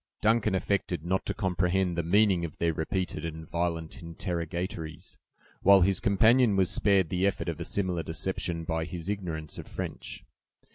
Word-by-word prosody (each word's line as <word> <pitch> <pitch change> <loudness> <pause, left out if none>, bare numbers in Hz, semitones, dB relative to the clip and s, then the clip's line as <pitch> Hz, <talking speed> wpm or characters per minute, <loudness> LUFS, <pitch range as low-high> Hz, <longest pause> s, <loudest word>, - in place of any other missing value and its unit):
Duncan 110 -2 +2
affected 90 -3 -1
not 95 +2 -1
to - - -1
comprehend 90 -1 0
the 85 - +1
meaning 95 +1 +3
of 80 -2 -5
their 85 -1 +1
repeated 90 +4 -2
and 80 -1 -6
violent 85 +2 -3
interrogatories, 85 -2 -5 0.4
while 100 0 +7
his 95 +2 +3
companion 110 +3 +4
was 95 -2 +3
spared 95 -5 +3
the 90 +2 +1
effort 100 - -2
of 85 -2 -3
a 85 - -4
similar 90 -4 -1
deception 85 0 -3
by 80 0 -2
his 85 +2 -6
ignorance 85 -7 -4
of - - -8
French. - - -6
90 Hz, 160 wpm, -28 LUFS, 85-95 Hz, 0.4 s, while